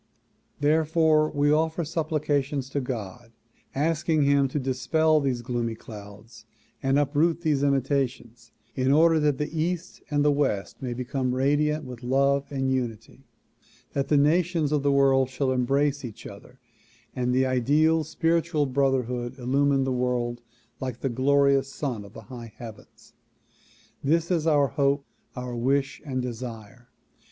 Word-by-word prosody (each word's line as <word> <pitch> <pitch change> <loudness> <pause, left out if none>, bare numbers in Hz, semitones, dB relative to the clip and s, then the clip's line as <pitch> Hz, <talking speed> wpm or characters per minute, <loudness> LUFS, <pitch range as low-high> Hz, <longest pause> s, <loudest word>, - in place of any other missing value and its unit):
Therefore 155 +1 +3
we 145 0 +1
offer 160 +2 +1
supplications 150 -4 -1
to 140 - -1
God, 115 -2 -6 0.4
asking 155 +1 +1
him 140 -1 +3
to 130 - -4
dispel 155 +4 +2
these 130 -4 -1
gloomy 120 -2 -2
clouds 105 +1 -12 0.3
and 135 +1 +2
uproot 150 +4 +1
these 150 -4 +1
imitations 135 -4 -1 0.2
in 130 0 +1
order 160 +2 +5
that 150 -3 +1
the 150 +2 -4
east 175 +3 -3
and 145 0 +1
west 105 -9 -1
may 125 -2 -3
become 125 0 -2
radiant 145 +3 +1
with 125 -2 -9
love 140 +2 +1
and 135 -1 -1
unity; 125 0 -4 0.7
that 140 -1 -1
the 150 - +3
nations 160 +1 +2
of 150 -2 +1
the 140 0 +2
world 135 -1 +3
shall 130 0 -1
embrace 140 +3 +1
each 115 -2 -9
other 115 +6 -12 0.6
and 125 -1 0
the 130 +1 +2
ideal 150 +6 +2
spiritual 165 0 0
brotherhood 130 -2 -1
illumine 135 +2 +1
the 130 - -1
world 125 -1 -1 0.4
like 130 -3 -5
the 135 - 0
glorious 140 +2 +3
sun 125 -9 -4
of 100 +1 -14
the - - -10
high 115 +1 -10
heavens. 115 -3 -12 0.9
This 165 +5 +1
is 165 -3 +1
our 145 -3 +3
hope, 140 +2 0 0.3
our 125 -1 -5
wish 135 +3 0
and 130 -4 -3
desire. 120 -1 -8
135 Hz, 145 wpm, -26 LUFS, 125-150 Hz, 0.9 s, order